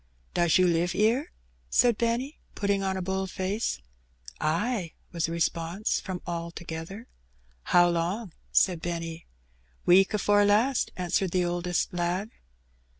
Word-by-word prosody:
"Does 170 -2 +3
you 185 - +4
live 175 0 +1
'ere?" 225 +7 +2 0.4
said 240 -2 +4
Benny, 240 +5 -1 0.2
putting 200 -1 0
on 190 -1 -1
a 185 - -3
bold 190 +1 -2
face. 190 - -2 0.6
Ay," 170 +3 -1 0.2
was 170 -2 -1
the - - -5
response 170 +3 -1
from 185 -2 -6
all 170 -1 -3
together. 170 +6 -7 0.6
How 175 0 +5
long?" 175 +3 -1 0.2
said 180 -4 +3
Benny. 165 -1 -5 0.6
"Week 190 +2 +6
afore 205 0 +3
last," 220 +6 +3
answered 180 +1 0
the 180 +1 +1
oldest 175 0 -1
lad. 180 +5 -1
180 Hz, 135 wpm, -27 LUFS, 170-205 Hz, 0.6 s, Week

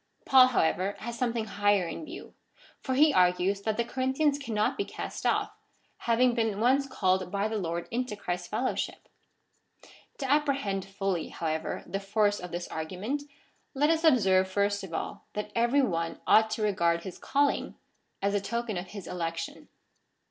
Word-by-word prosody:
Paul, 260 -2 +8
however, 195 -3 +1
has 235 +1 -6
something 235 -2 -1
higher 205 -3 +2
in 240 - -6
view, 335 +5 -10 0.5
for 260 - -2
he 300 +2 +5
argues 180 +2 +3
that 215 +1 -1
the 235 - +2
Corinthians 265 +4 +1
cannot 220 -6 0
be 400 - -1
cast - - -5
off, - - +1 0.5
having 240 +1 +2
been 225 -4 0
once, 265 +4 +3
called 185 -7 0
by 200 +1 0
the 220 -1 -2
Lord 170 -1 -3
into 245 -1 -2
Christ's 180 -3 -4
fellowship. - - -2 1.1
To 270 - -3
apprehend 275 -9 +1
fully, 195 -3 -2
however, 160 -1 -3
the 195 - -3
force 205 +1 +1
of 180 - -7
this 175 +1 -4
argument, 185 - -3 0.5
let 295 +3 +3
us 325 0 +1
observe 195 - +4
first 200 +1 0
of 190 - -8
all, 165 - -5
that 210 - -4
every 240 +4 +3
one 165 -7 -1
ought 220 0 +5
to 220 0 -2
regard 170 -5 +1
his 185 - -8
calling 285 +1 0 0.5
as 200 0 +2
a 205 - +1
token 235 0 -3
of 180 +2 -5
his 200 -1 -8
election. 165 -1 -4
210 Hz, 165 wpm, -29 LUFS, 185-255 Hz, 1.1 s, Paul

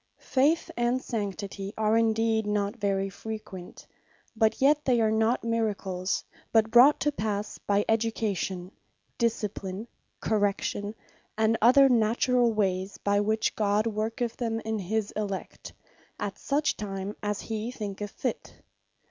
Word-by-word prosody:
Faith, 290 +5 +1
and 240 +1 +1
Sanctity, 200 -4 -4
are 215 0 +2
indeed 225 -1 +2
not 205 +1 0
very 195 -3 0
frequent; 195 -3 -8 0.5
but 220 0 +2
yet 295 +2 +4
they 250 -4 +3
are 220 -1 +3
not 220 +2 +2
Miracles, 205 -5 -1 0.3
but 220 -1 +3
brought 255 +5 +7
to 295 - +1
passe 210 -5 -3
by 205 0 +2
education, 205 -5 -1 0.5
discipline, 210 -3 -2 0.3
correction, 205 0 -1 0.4
and 220 +1 +3
other 260 +5 +7
naturall 240 +1 +3
wayes, 195 -2 -1
by 205 0 +1
which 215 +1 0
God 210 0 +2
worketh 225 +2 -2
them 225 -2 -1
in 220 -1 -2
his 205 +2 -1
elect, 200 -3 -5 0.5
as 205 -1 -2
such 290 +2 0
time 195 -1 -4
as 205 -1 -2
he 220 +1 -4
thinketh 205 -4 -5
fit. - - -4
215 Hz, 130 wpm, -28 LUFS, 205-230 Hz, 0.5 s, brought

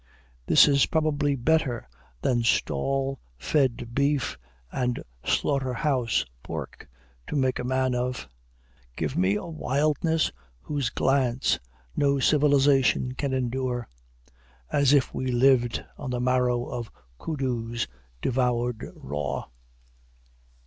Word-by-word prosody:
This - - +7
is 140 -2 +4
probably 150 -3 +1
better 135 -2 +1 0.4
than 120 -2 +2
stall 135 - 0 0.2
fed 120 - 0
beef 140 +1 +1 0.4
and 125 -1 -1 0.2
slaughter 135 -3 0
house 125 - +1 0.2
pork - - -7 0.4
to - - -4
make 130 -2 +1
a - - -2
man 130 0 +1
of. 125 - -2 0.7
Give - - -2
me 95 +3 +2
a 105 - -3
wildness 155 +1 0 0.3
whose 145 -4 -2
glance 130 -2 +1 0.4
no 140 -1 +2
civilization 140 -2 +3
can 140 +1 -2
endure, 125 -1 -1 0.8
as 140 -2 +4
if 140 -3 +3
we 130 - -2
lived 120 -1 +3
on 140 - -5
the 125 -1 -1
marrow 125 -1 +1
of 120 -2 -5 0.3
koodoos 120 -6 -2 0.4
devoured 125 -2 0
raw. 75 +1 -4
130 Hz, 110 wpm, -26 LUFS, 120-140 Hz, 0.8 s, This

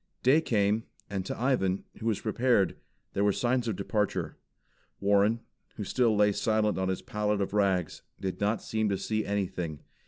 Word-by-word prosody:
Day 140 +6 +5
came, 110 -4 +1 0.3
and 95 -2 -2
to - - -4
Ivan, 105 -7 +1 0.2
who 110 - -3
was 110 -3 0
prepared, 115 -2 +2 0.4
there 100 - +1
were 105 - +4
signs 120 +3 0
of 110 - 0
departure. 105 +2 -1 0.6
Warren, 100 +3 +3 0.3
who 105 - -4
still 115 +2 +2
lay 105 0 +4
silent 110 -1 +1
on 95 0 0
his 95 - -2
pallet 105 -4 -1
of 100 0 -2
rags, 95 -5 +1 0.2
did 95 0 -4
not 105 +2 +1
seem 110 -1 0
to 100 - 0
see 110 +3 -1
anything. 90 -7 -2
105 Hz, 175 wpm, -29 LUFS, 100-110 Hz, 0.6 s, Day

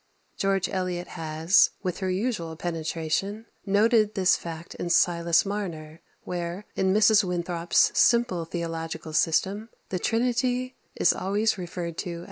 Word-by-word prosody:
George 195 -1 0
Eliot 180 -2 -3
has, 160 +2 +3
with 180 -3 -3
her 190 -2 -2
usual 185 -4 -2
penetration, 165 +5 -3 0.2
noted 215 +1 +3
this 185 -2 +4
fact 165 0 -7
in 175 - -5
"Silas 170 0 +3
Marner," 170 -6 -5 0.2
where, 175 +3 -4
in 190 0 +1
Mrs. 215 +1 +5
Winthrop's 175 -1 +1
simple 235 -8 +3
theological 165 -1 -5
system, 195 +7 +1 0.2
the 185 - -2
Trinity 250 +3 0 0.2
is - - +3
always 205 +2 0
referred 170 -1 -5
to - - -3
as - - -4
"Them." 170 - -7
180 Hz, 135 wpm, -26 LUFS, 170-205 Hz, 0.2 s, Mrs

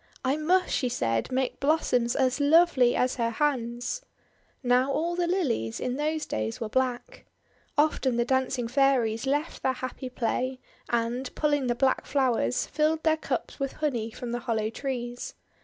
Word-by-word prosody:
'I 265 +3 +2
must," 360 +4 +2
she 250 - +1
said, 115 - -1
<;<make 260 0 -1
blossoms 265 -5 +2
as 260 +1 +1
lovely 285 -4 +5
as 250 +1 +1
her 230 -1 +1
hands." 245 - -1 0.6
Now 250 +2 +3
all 335 +5 0
the 350 -1 0
Lilies, 265 - 0
in 250 0 -2
those 305 +2 -1
days, 110 +1 -3
were 225 - -3
black. 260 - -2 0.5
Often 285 -4 +2
the 235 - +2
dancing 260 -1 0
Fairies 250 -3 +2
left 290 +4 -1
their 260 - +1
happy 255 +1 -6
play, 255 +1 -2 0.3
and, 240 +2 -1
pulling 290 -3 +1
the 240 - +1
black 265 +1 +1
flowers, 245 - +1
filled 310 +1 0
their 315 -1 +4
cups 315 - -4
with 275 -1 -2
honey 245 -8 -1
from 235 +1 -6
the 240 - -2
hollow 220 -3 -1
trees. 245 -2 -4
260 Hz, 160 wpm, -27 LUFS, 240-295 Hz, 0.6 s, lovely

